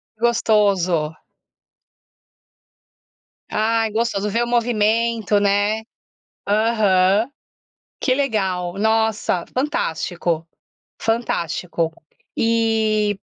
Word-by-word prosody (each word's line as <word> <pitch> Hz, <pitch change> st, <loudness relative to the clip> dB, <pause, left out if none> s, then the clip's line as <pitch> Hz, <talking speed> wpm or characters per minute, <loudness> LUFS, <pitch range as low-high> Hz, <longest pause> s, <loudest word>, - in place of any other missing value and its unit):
Gostoso. 200 Hz, -8 st, +2 dB, 2.4 s
Ai 225 Hz, +1 st, +1 dB
gostoso, 215 Hz, -2 st, -1 dB
ver 230 Hz, +4 st, +1 dB
o -, -, -3 dB
movimento, 230 Hz, -2 st, +1 dB
né? 205 Hz, +2 st, +1 dB, 0.6 s
Aham. 210 Hz, -1 st, +3 dB, 0.7 s
Que 255 Hz, -, +2 dB
legal. 190 Hz, -10 st, -1 dB
Nossa, 220 Hz, -4 st, +1 dB
fantástico, 175 Hz, -, -1 dB, 0.5 s
fantástico. 175 Hz, -7 st, -1 dB, 0.4 s
E 220 Hz, -3 st, +1 dB
215 Hz, 65 wpm, -21 LUFS, 190-230 Hz, 2.4 s, Aham